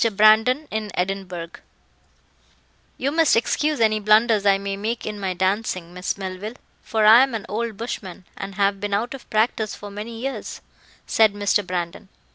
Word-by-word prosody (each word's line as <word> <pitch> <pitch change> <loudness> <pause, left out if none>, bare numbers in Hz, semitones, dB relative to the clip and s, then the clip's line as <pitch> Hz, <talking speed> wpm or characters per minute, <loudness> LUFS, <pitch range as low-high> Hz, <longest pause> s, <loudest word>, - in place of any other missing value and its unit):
Brandon 220 +8 +4
In 215 -1 -3
Edinburgh 180 -2 -3 1.5
"You 275 +2 -1
must 320 0 +4
excuse 295 +5 +1
any 215 -1 +3
blunders 215 0 +3
I 195 -1 +5
may 195 0 -4
make 220 +4 -3
in 210 -1 -5
my 190 -2 -2
dancing, 185 -2 -1
Miss 180 +2 -3
Melville, 195 +3 -6 0.3
for 220 -1 0
I 225 +3 +9
am 265 -3 +1
an 215 - -5
old 220 +2 -3
bushman, 190 -6 -6
and 195 0 -7
have 200 0 +1
been 205 0 -1
out 230 +6 -2
of 270 - -11
practice 220 -1 0
for 205 0 -9
many 220 +3 -7
years," 270 +3 -5 0.5
said 220 -2 +3
Mr. 205 0 +1
Brandon. 180 +2 -4
210 Hz, 165 wpm, -22 LUFS, 195-225 Hz, 1.5 s, I